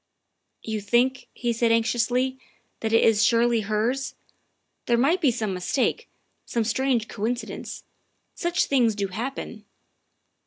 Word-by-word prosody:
" - - -42
You 215 - -2
think," 245 +5 +1
he 240 -1 -2
said 230 0 +2
anxiously, 245 +3 +1 0.2
" 240 - -44
that 220 - -2
it 225 - +5
is 215 -2 +4
surely 235 0 +3
hers? 220 +6 -1 0.7
There 235 - +3
might 310 +10 +2
be 295 - +4
some 215 -4 -2
mistake, 185 +8 -1 0.3
some 235 - -1
strange 240 0 0
coin 225 +4 -1
cidence. 245 - -7 0.5
Such 345 0 0
things 240 -6 +2
do 200 -1 -2
happen." 230 +1 -5
235 Hz, 145 wpm, -25 LUFS, 220-255 Hz, 0.7 s, it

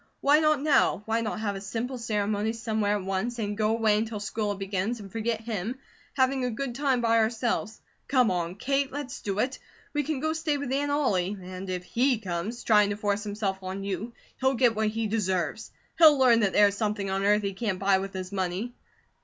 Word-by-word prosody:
Why 290 +2 +5
not 305 -3 +2
now? 280 -8 +3
Why 225 +1 0
not 215 -1 -3
have 205 -2 -1
a 195 - -6
simple 240 +5 -4
ceremony 210 -1 -1
somewhere 220 -3 0
at 200 - -6
once, 195 +6 -2
and 205 -2 -2
go 215 0 +1
away 220 -2 +3
until 220 -1 -3
school 210 0 -2
begins, 195 +4 -2
and 195 -2 -10
forget 225 +1 -2
him, 225 +1 -3 0.4
having 260 -1 +2
a 250 - 0
good 245 +2 -3
time 265 -1 +1
by 230 -1 +3
ourselves? 220 -1 -1 0.3
Come 255 -6 +3
on, 175 -1 -2
Kate, 275 +5 0
let's 280 -2 -6
do 200 -1 -3
it! 255 +5 -1 0.3
We 295 - +1
can 295 -1 -2
go 315 +3 0
stay 320 -2 -1
with 280 -2 -4
Aunt 285 +2 0
Ollie, 205 -10 +1
and 185 +1 -7
if 180 -1 -3
he 250 +6 +1
comes 205 +4 -4
trying 210 -2 +4
to 205 - -2
force 205 -1 0
himself 200 -2 -3
on 190 +1 -5
you, 200 +4 -3 0.3
he'll 265 +1 +2
get 245 -1 +4
what 215 0 +1
he 225 +1 -1
deserves. 200 -2 -1 0.3
He'll 310 -3 +8
learn 250 -3 +5
that 200 -4 +1
there 205 -1 +6
is 200 - -6
something 205 -2 -1
on 195 +1 -1
earth 210 +1 +3
he 200 -1 -2
can't 200 -1 -2
buy 195 0 +3
with 195 0 -5
his 185 0 -5
money." 190 +5 -2
220 Hz, 215 wpm, -27 LUFS, 200-245 Hz, 0.4 s, He'll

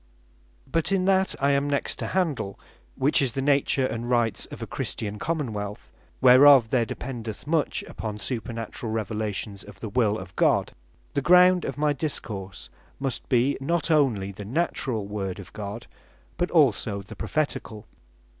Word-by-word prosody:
But 165 +2 0
in 190 -2 +2
that 190 0 +2
I 140 +1 +3
am 140 +1 +1
next 140 -1 -1
to - - -4
handle, 155 - -1 0.4
which 140 +3 +2
is 130 -4 0
the 135 - -2
Nature 140 -1 +2
and 120 -1 -3
Rights 120 -3 +1
of - - -9
a - - -3
CHRISTIAN 105 -1 -4
COMMON 150 -7 -2
WEALTH, 100 -12 -6 0.3
whereof 130 -1 +8
there 120 -3 +2
dependeth 115 -5 -6
much 155 0 0
upon 110 -2 -6
Supernaturall 115 -1 -4
Revelations 105 -2 -3
of 100 -2 -13
the 110 - -5
Will 110 -1 +2
of 95 -3 -10
God; - - +2 0.4
the 140 - 0
ground 180 +3 +6
of 135 - -4
my 150 0 +2
Discourse 100 - -5 0.3
must 135 -3 -4
be, 130 +2 +2
not 165 +3 0
only 120 -11 +2
the 100 +1 -9
Naturall 125 - -1
Word 100 -3 -4
of 100 -2 -11
God, 105 +2 -6 0.5
but 175 - -1
also 115 - +2
the 100 - -11
Propheticall. 140 -8 -3
120 Hz, 160 wpm, -26 LUFS, 105-145 Hz, 0.5 s, whereof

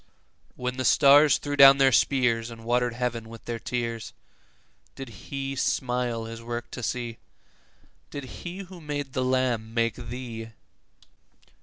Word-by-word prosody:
When 125 0 -4
the 130 - -1
stars 145 +2 +6
threw 145 0 -4
down 140 -1 +9
their 135 -1 +5
spears, 120 -3 +2
And 115 -1 -11
water'd 120 0 +1
heaven 120 -2 -3
with 115 0 -12
their 120 -1 -4
tears, 115 -3 -4 0.8
Did 135 -2 -8 0.2
He 135 0 -3
smile 125 -3 -1
His 115 0 -8
work 120 0 -5
to - - -6
see? 120 0 -3 0.9
Did 145 - -6
He 150 - -8
who 185 -2 -12
made 145 -3 -4
the 130 - 0
lamb 125 -3 0
make 115 -1 +2
thee? 115 -2 -7
125 Hz, 145 wpm, -26 LUFS, 115-135 Hz, 0.9 s, down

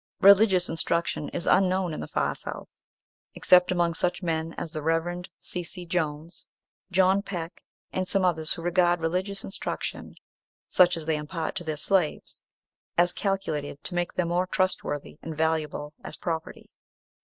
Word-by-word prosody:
Religious 195 -2 +6
instruction 165 -1 -1
is 170 - -3
unknown 185 -2 +3
in - - -5
the - - -5
far - - 0
South, - - -8 0.5
except 180 0 +5
among 175 -2 +2
such 180 +2 0
men 165 -1 -1
as 160 - -5
the 155 -2 -4
Rev. 165 +3 -1
C. 180 - -3
C. 175 +1 -6
Jones, 165 -1 -3 0.4
John 190 +1 +4
Peck, 175 -4 -6 0.3
and 185 0 -1
some 195 -1 +2
others 160 -3 +1
who 165 - -8
regard 175 0 +3
religious 185 +4 -2
instruction, 195 - -5 0.5
such 175 -1 +5
as 160 - -5
they 160 -1 +1
impart 160 +2 -4
to - - -3
their 155 -2 -3
slaves, 175 +1 0 0.5
as 175 +1 +4
calculated 160 -7 -2
to - - -1
make 175 -1 -1
them 175 -2 0
more 180 +2 +1
trustworthy 180 -7 -1
and 160 -2 -6
valuable 155 -2 -1
as - - -7
property. 165 -2 -5
175 Hz, 155 wpm, -27 LUFS, 160-185 Hz, 0.5 s, Religious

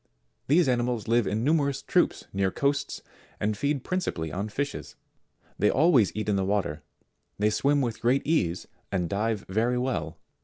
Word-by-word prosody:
These 160 +3 +4
animals 120 -3 0
live 115 -2 +2
in 110 +3 -1
numerous 140 -2 +1
troops - - +1
near 95 -1 +1
coasts, 140 +7 -1 0.4
and 105 +1 0
feed 140 +4 -1
principally 90 - -2
on 100 +6 -3
fishes: 140 +6 -4 0.6
they 105 - +4
always 130 - +4
eat 110 0 -3
in 105 -2 +2
the 95 - +1
water; 95 -6 -1 0.6
they 105 +1 +2
swim 140 +5 +2
with 120 -4 -3
great 125 +4 +2
ease 90 - 0 0.2
and 90 -3 0
dive 105 +3 -1
very 115 +6 +1
well. 90 - -2
115 Hz, 160 wpm, -27 LUFS, 100-140 Hz, 0.6 s, These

